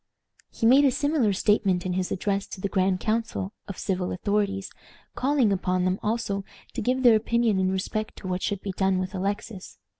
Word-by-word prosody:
He - - -3
made 265 +5 +7
a 280 - +6
similar 285 -4 +1
statement 190 -2 +2
in 180 - -1
his 185 0 -2
address 195 +1 -1
to - - -8
the 200 - -1
grand 190 -1 +1
council 220 -2 -2
of 200 - -7
civil 185 -2 -2
authorities, 200 0 -1 0.4
calling 265 -6 +2
upon 185 -1 0
them 185 +1 0
also 210 -3 -1 0.3
to 245 - -3
give 255 +4 0
their 240 -3 +7
opinion 225 -1 +2
in 185 0 +2
respect 215 +3 -3
to 190 - -8
what 185 0 -2
should 200 -2 -2
be 195 - -4
done 190 0 +1
with 185 +1 -3
Alexis. 195 +1 -4
200 Hz, 190 wpm, -26 LUFS, 185-225 Hz, 0.4 s, made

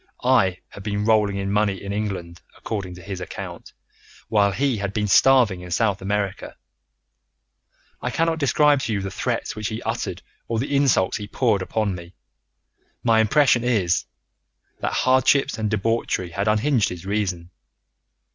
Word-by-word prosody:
I 115 -8 +3
had 100 - -11
been 105 0 -2
rolling 105 -3 +3
in 100 0 -2
money 100 -2 +1
in 100 0 -4
England, 95 -5 -4 0.2
according 95 -5 -5
to 90 - -12
his 95 0 -6
account, 90 - -8 0.6
while 100 -2 +3
he 135 +1 0
had 100 -1 -3
been 105 -1 0
starving 110 -2 +4
in 90 - -9
South 100 +1 0
America. 100 0 -3 1.4
I - - -2
cannot 165 0 0
describe 145 +1 +3
to 115 -4 -2
you 100 - -1
the 95 - -4
threats - - -2
which 110 -1 -3
he 110 0 -4
uttered - - -3 0.2
or 115 - -1
the 135 +4 -1
insults 130 -10 +2
which - - -6
he - - -17
poured 110 -7 +2
upon 105 +1 -1
me. 85 0 -10 0.9
My 115 -2 +4
impression 120 +2 +4
is, 100 -9 +1 0.7
that - - -2
hardships 130 +1 +3
and 110 -1 0
debauchery 105 -4 -1
had 100 +4 -2
unhinged 110 +2 +2
his 90 0 -8
reason. 95 -4 -2
105 Hz, 160 wpm, -23 LUFS, 95-115 Hz, 1.4 s, starving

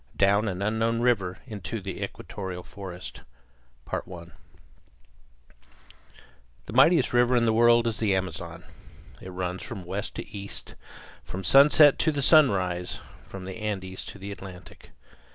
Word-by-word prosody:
DOWN 100 +2 +3
AN 95 0 -3
UNKNOWN 115 +2 0
RIVER 95 -7 +1
INTO 105 -3 -5
THE 95 -1 -6
EQUATORIAL 95 -3 -6
FOREST 95 -3 -9 0.7
The - - -1 2.7
mightiest 135 +3 +5
river 120 +1 +4
in 120 -1 +3
the 110 - +3
world 120 +1 +5
is 115 -2 -2
the 105 -4 +2
Amazon. 95 -1 -4 0.6
It 95 - -8
runs 90 0 -4
from 100 -7 -7
west 95 +4 -4
to - - -6
east, 95 -9 -7 0.5
from 95 - -6
the - - -9
sunset 145 +1 +7
to 160 - +2
the 145 -2 -2
sunrise, 95 - +3 0.3
from 95 -1 -8
the 95 0 -7
Andes 95 -3 -4
to - - -9
the 100 +1 -7
Atlantic. 90 -3 -11
100 Hz, 135 wpm, -26 LUFS, 95-115 Hz, 2.7 s, sunset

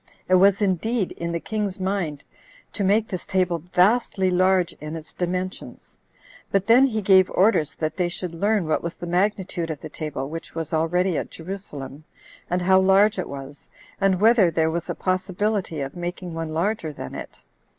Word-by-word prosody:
It 185 - +1
was 195 +2 +5
indeed 200 +2 0
in 170 0 -4
the 170 - -2
king's 205 0 -3
mind 185 -6 -2 0.5
to 205 - -2
make 210 +3 +3
this 185 -3 -5
table 180 -3 +1
vastly 185 +3 +2
large 185 -1 +2
in 155 +1 -5
its 160 -1 -9
dimensions; 180 +1 -5 0.5
but 195 -1 +1
then 245 +5 +6
he 220 -4 -2
gave 190 -1 +5
orders 185 -6 +2
that 155 +1 -3
they 180 -2 +1
should 175 -1 -5
learn 200 +2 +1
what 155 - +1
was 170 0 -5
the - - -7
magnitude 180 -1 -1
of 155 -3 -4
the 155 - -7
table 150 -3 -5
which 165 +2 -8
was 165 -2 -4
already 170 +2 +1
at - - -5
Jerusalem, 155 -6 -8 0.5
and 180 0 0
how 190 +1 +5
large 195 +2 +4
it 185 - -3
was, 140 +1 -9 0.3
and 195 -2 +3
whether 215 -3 +5
there 160 0 +1
was 170 0 -4
a - - -2
possibility 185 -2 -1
of 135 +1 -5
making 175 0 -5
one 165 -1 -4
larger 165 +1 -1
than 65 - -8
it. - - -9
180 Hz, 180 wpm, -24 LUFS, 165-195 Hz, 0.5 s, then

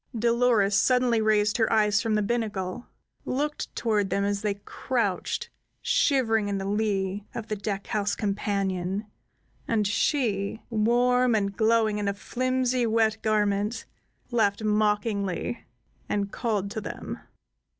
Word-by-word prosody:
Dolores 235 -3 +3
suddenly 250 -1 +3
raised 210 -1 +2
her 225 -2 +2
eyes 210 -1 +3
from 225 -2 0
the 210 - +1
binnacle, 210 -1 -2 0.4
looked 295 +3 -3
toward 210 -4 +1
them 200 - 0
as 200 0 -1
they 210 -2 -1
crouched 200 - -2 0.3
shivering 250 - +2
in 200 -1 -1
the 195 - -4
lee 200 -1 -1
of 225 -1 -5
the 215 - -1
deck 200 0 -4
house 205 -1 -1
companion, 195 -1 -1 0.6
and 220 -2 +1
she, 210 -2 0
warm 245 +2 +3
and 200 -2 0
glowing 220 -1 +2
in 205 - -2
a 200 - 0
flimsy, 255 +2 0
wet 220 -1 +2
garment, 210 +1 0 0.5
laughed 220 -3 +1
mockingly, 210 - 0 0.5
and 200 -1 -1
called 205 -4 -2
to 220 - -4
them. - - -6
215 Hz, 130 wpm, -26 LUFS, 200-230 Hz, 0.6 s, Dolores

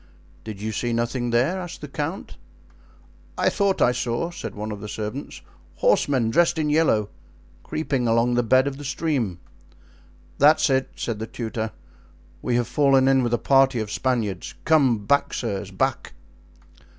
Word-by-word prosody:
"Did 110 -3 -7
you 110 +2 -3
see 120 +3 -2
nothing 120 +1 -1
there?" 130 +11 +1
asked 175 -1 -8
the 150 - -6
count. 150 +6 -5 1.0
"I - - +3
thought 200 -2 +1
I 125 - +4
saw," 125 +7 -2
said 115 - -7
one 105 +1 -5
of 105 - -6
the 105 - -6
servants, 110 +6 -6 0.3
"horsemen 135 - +2
dressed 170 +6 +3
in 150 -2 0
yellow, 150 -10 +2 0.5
creeping 135 -6 -2
along 115 +2 +2
the 120 - +3
bed 130 +3 +3
of 140 -1 -3
the 145 - -9
stream. 140 - -1 1.0
"That's 150 0 +5
it," 130 0 +1
said 115 -3 -4
the 110 - -4
tutor. 110 -2 -4 0.7
"We 125 - -1
have 120 -1 +1
fallen 135 -2 +3
in 135 -1 +4
with 120 -1 +1
a - - -1
party 135 -2 +3
of 105 -1 -4
Spaniards. 115 -8 -2
Come 130 -10 +3
back, 140 +6 +2
sirs, 100 -5 -3
back." 95 - -2
125 Hz, 160 wpm, -23 LUFS, 110-145 Hz, 1.0 s, That's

